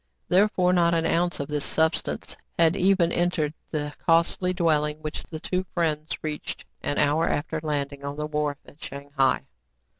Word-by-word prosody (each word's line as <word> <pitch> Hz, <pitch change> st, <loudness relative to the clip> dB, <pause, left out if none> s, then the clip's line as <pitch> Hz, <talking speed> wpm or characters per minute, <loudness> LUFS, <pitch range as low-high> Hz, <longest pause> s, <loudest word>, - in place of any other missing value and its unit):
Therefore 185 Hz, -1 st, +4 dB
not 170 Hz, -1 st, +4 dB
an 165 Hz, 0 st, +1 dB
ounce 175 Hz, +2 st, +1 dB
of 140 Hz, -, -3 dB
this 150 Hz, -1 st, -1 dB
substance 160 Hz, +1 st, 0 dB, 0.2 s
had 165 Hz, +1 st, +4 dB
even 185 Hz, -3 st, +3 dB
entered 170 Hz, -4 st, +1 dB, 0.2 s
the 150 Hz, -2 st, -3 dB
costly 170 Hz, +2 st, +3 dB
dwelling 155 Hz, -4 st, +1 dB
which 155 Hz, 0 st, -3 dB
the 155 Hz, -, -7 dB
two 185 Hz, +3 st, -1 dB
friends 155 Hz, -3 st, 0 dB
reached 150 Hz, -1 st, -5 dB, 0.2 s
an 145 Hz, -, -2 dB
hour 155 Hz, +3 st, +3 dB
after 155 Hz, +2 st, -1 dB
landing 140 Hz, -2 st, -2 dB
on 140 Hz, 0 st, -4 dB
the 150 Hz, 0 st, -3 dB
wharf 150 Hz, -1 st, -1 dB
at 145 Hz, -, -15 dB
Shang 140 Hz, +1 st, -8 dB
hai. 135 Hz, -2 st, +3 dB
155 Hz, 170 wpm, -26 LUFS, 150-170 Hz, 0.2 s, Therefore